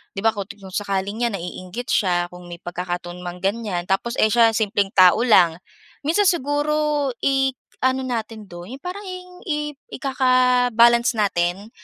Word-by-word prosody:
'di 195 - -3
ba, 225 - +4
kung 200 - -3 0.2
kung 190 -1 -11
sakaling 200 +3 -2
yan 230 - -4
naiinggit 185 +6 -7
siya, 175 -4 +1
kung 180 0 -12
may 170 -1 -9
pagkakataon 175 0 -5
mang 180 0 -6
ganyan. 195 -3 -1
Tapos 235 +5 -1
eh, - - +5
siya 230 0 +5
simpleng 205 -2 0
tao 185 +5 +6
lang. 180 -9 +5 0.5
Minsan 340 +8 +2
siguro, 295 -2 +1
i-ano 265 -1 0
natin 225 -3 -4
do'n 175 +8 -9
yong 275 - -16
parang, 370 +3 -6
yong 365 0 -8 0.2
i 295 -1 -2 0.2
ikaka-balance 250 -3 +3
natin, 195 -1 0
225 Hz, 150 wpm, -22 LUFS, 185-265 Hz, 0.5 s, tao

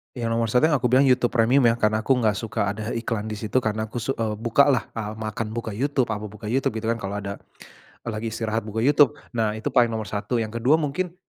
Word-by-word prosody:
Yang 115 -2 -2
nomor 115 0 +1
1 125 +3 +2
yang 145 - +3
aku 125 - +1
bilang 130 +3 +4
YouTube 125 -2 +3
Premium 120 +2 +3
ya, 115 - +3
karena 110 -1 +1
aku 130 +5 +2
enggak 110 -4 +1
suka 105 -3 -1
ada 110 +1 -6
eh 115 -1 -3
iklan 110 -3 -2
di 110 - -4
situ 110 +4 0
karena 110 -2 -2
aku 110 +2 -5
su 135 +4 -2
e 115 - -1
buka 115 +5 +4
lah, 130 - 0
e 115 - -3
makan 110 0 -4
buka 110 -2 -4
YouTube, 135 +1 0
apa 105 -1 -3
buka 105 0 -8
YouTube, 130 +5 +1
gitu 110 - -4
kan. 115 - +2
Kalo 100 -2 -4
ada 100 0 -5 0.7
kalo 120 - -4
lagi 115 - -4
istirahat 110 0 -2
buka 110 +1 -3
YouTube. 145 +2 +5 0.2
Nah, 110 -3 0
itu 110 - -3
paling 125 -2 +4
nomor 110 -3 -4
1. 105 +3 -1
Yang 110 +1 -4
kedua 125 +6 +3
mungkin, 165 +3 -1
115 Hz, 255 wpm, -24 LUFS, 110-125 Hz, 0.7 s, YouTube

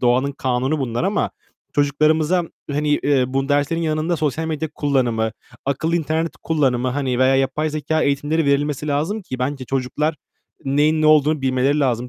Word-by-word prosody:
doğanın 130 +3 +2
kanunu 130 +3 -1
bunlar 120 +1 -2
ama 200 +2 0 0.4
çocuklarımıza, 155 +4 +2 0.3
hani, 150 +1 -1
eee, 140 -3 +2
bu 135 +1 -1
derslerin 145 +3 +1
yanında 160 +1 0
sosyal 155 +1 -1
medya 160 0 -2
kullanımı, 120 -6 0 0.3
akıllı 160 +5 0
internet 160 +1 -1
kullanımı 130 -6 +1
hani 130 -2 -1
veya 130 +1 +4
yapay 135 +4 0
zekâ 155 +1 -1
eğitimleri 145 +3 +1
verilmesi 145 +1 0
lazım 160 +10 -1
ki 130 -8 -6
bence 130 +1 -2
çocuklar 135 +4 -1 0.5
neyin 150 +3 +2
ne - - +4
olduğunu 155 -1 +4
bilmeleri 135 +3 +1
lazım. 125 -2 0
145 Hz, 155 wpm, -21 LUFS, 130-155 Hz, 0.5 s, veya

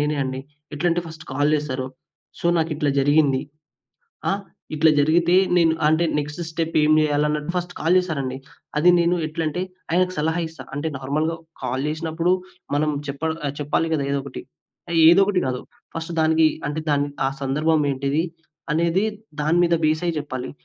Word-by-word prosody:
నేనే 150 +1 0
అండి. 130 0 -4 0.3
ఎట్లాంటే 170 +3 +1
ఫస్ట్ 160 0 -10
కాల్ 145 +2 +2
జేస్తారు. 135 -4 -2 0.5
"సో, - - -1
నాకిట్లా 155 -3 0
జరిగింది. 145 -1 +3 0.9
ఆ? - - +2 0.4
ఇట్ల 155 +1 +4
జరిగితే 170 +4 +3 0.2
నేను 165 -2 +4
అంటే 160 +2 +3
నెక్స్ట్ 150 +2 -4
స్టెప్ 165 0 -2
ఏం 150 0 +4
జేయాలి" 150 -1 +2
అన్నట్టు 150 +2 -2
ఫస్ట్ 175 0 -3
కాల్ 165 +3 +3
జేశారండి. 140 -8 -2 0.4
అది 175 +4 +6
నేను 170 +1 +2
ఎట్లంటే 160 +2 -2 0.3
ఆయనకి 185 +2 +2
సలహా 160 +3 0
ఇస్తా. 160 -5 -11
అంటే 145 +3 -1
నార్మల్‌గా 155 +5 -1 0.3
కాల్ 130 +3 -2
జేసినప్పుడు 160 +3 0 0.4
మనం 150 +1 +1 0.2
చెప్పాల్ 160 +3 -2
ఆహ్, 140 -1 -2
చెప్పాలి 150 +3 0
గదా! 140 -3 -1
ఏదో 140 - 0
ఒకటి. 140 - -7 0.5
ఆ - - -2 0.2
ఏదో 175 +4 +7
ఒకటి 195 -2 +1
గాదు, 125 -1 -2 0.4
ఫస్ట్ 165 +1 -4
దానికి 160 0 +4 0.2
అంటే 150 +2 -3 0.4
ఆ - - +3
సందర్భం 155 +4 +1
ఏంటిది 140 +3 0 0.5
అనేది 170 +5 +2 0.4
దాని 155 +4 +2
మీద 170 0 +3
బేస్ 155 +1 +2
అయి 170 - 0
జెప్పాలి. 130 -4 -5
155 Hz, 160 wpm, -22 LUFS, 145-165 Hz, 0.9 s, ఏదో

